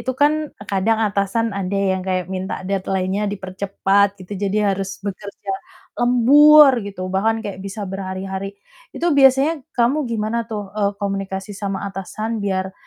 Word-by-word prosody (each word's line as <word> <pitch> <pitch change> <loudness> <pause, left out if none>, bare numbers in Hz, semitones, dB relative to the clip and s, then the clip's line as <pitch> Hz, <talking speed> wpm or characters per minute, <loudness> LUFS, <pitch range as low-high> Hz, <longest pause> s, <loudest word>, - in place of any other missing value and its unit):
itu 260 - -2
kan 295 +1 +5 0.4
kadang 210 +3 +1
atasan 200 +3 0
ada 195 +1 -2
yang 190 -1 +1
kayak 185 -1 -1
minta 185 0 -4
deadline-nya 195 +1 -1
dipercepat 195 +1 0
gitu, 185 +2 -9
jadi 200 0 +1
harus 195 0 -4
bekerja 200 0 -6 0.5
lembur 280 +4 +7
gitu, 200 -2 -8
bahkan 220 +4 +1
kayak 195 -2 -6
bisa 200 +2 -5
berhari-hari. 190 +1 -5 0.4
Itu 345 -1 +1
biasanya 275 +3 +4 0.2
kamu 250 +3 +2
gimana 225 +1 -2
tuh, 205 -3 -5
e 215 - -4 0.2
komunikasi 195 0 -3
sama 195 0 -4
atasan, 215 +4 -4
biar 190 -1 -1
200 Hz, 140 wpm, -20 LUFS, 190-225 Hz, 0.5 s, lembur